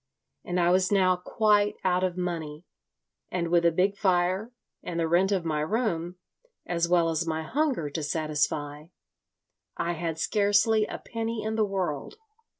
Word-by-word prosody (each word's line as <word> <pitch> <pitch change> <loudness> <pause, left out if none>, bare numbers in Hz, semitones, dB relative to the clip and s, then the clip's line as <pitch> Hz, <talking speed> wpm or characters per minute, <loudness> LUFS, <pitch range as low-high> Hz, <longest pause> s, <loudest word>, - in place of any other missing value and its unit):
And 180 0 -2
I 175 0 +3
was 185 +1 +2
now 185 -2 +4
quite 210 +3 +2
out 180 0 +2
of 185 -1 -1
money; 165 -3 -4 0.6
and 170 -2 -2
with 170 0 +3
a - - +4
big 190 +4 +1
fire 185 +3 +1 0.3
and 170 -1 -4
the 165 - +1
rent 180 +4 +3
of 185 -4 0
my 155 -2 -1
room, 175 -1 -1 0.5
as 170 -1 -1
well 170 -2 +3
as 165 +1 -1
my 160 0 -2
hunger 270 - 0
to 160 - -3
satisfy, 150 -1 -2 0.9
I 170 - -1
had 165 -1 -3
scarcely 210 +3 +2
a - - -5
penny 230 -1 -4
in 220 0 -2
the 220 -1 +2
world. 185 - -3
180 Hz, 160 wpm, -27 LUFS, 165-205 Hz, 0.9 s, now